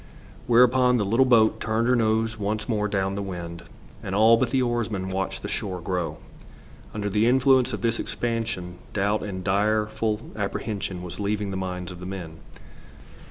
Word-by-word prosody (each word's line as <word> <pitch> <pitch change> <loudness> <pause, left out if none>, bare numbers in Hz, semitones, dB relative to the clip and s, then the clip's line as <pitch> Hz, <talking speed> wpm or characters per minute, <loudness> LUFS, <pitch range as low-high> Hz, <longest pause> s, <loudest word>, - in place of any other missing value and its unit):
Whereupon 125 +1 +5
the 105 - 0
little 115 +6 +3
boat 115 -3 +4
turned 110 +1 0
her 125 - +4
nose 110 -1 +1
once 105 +1 -2
more 105 -3 0
down 95 -1 -1
the 100 - -3
wind, 85 -3 -6 0.4
and 95 - -4
all 110 +2 +6
but 120 +1 +1
the 130 - +1
oarsman 110 -6 -2
watched 95 0 -3
the - - -3
shore 95 -3 -3
grow. 90 0 -3 0.7
Under 105 -1 -3
the 105 +3 +2
influence 130 0 +4
of 105 - -4
this 115 0 0
expansion 115 -7 -3
doubt 100 +1 +1
and 95 -3 -5
direful 110 +2 0
apprehension 100 -3 -3
was 90 +2 -7
leaving 105 0 -1
the - - -4
minds 90 -1 -4
of 90 - -10
the 90 - -7
men. 85 -5 -7
105 Hz, 170 wpm, -25 LUFS, 95-115 Hz, 0.7 s, all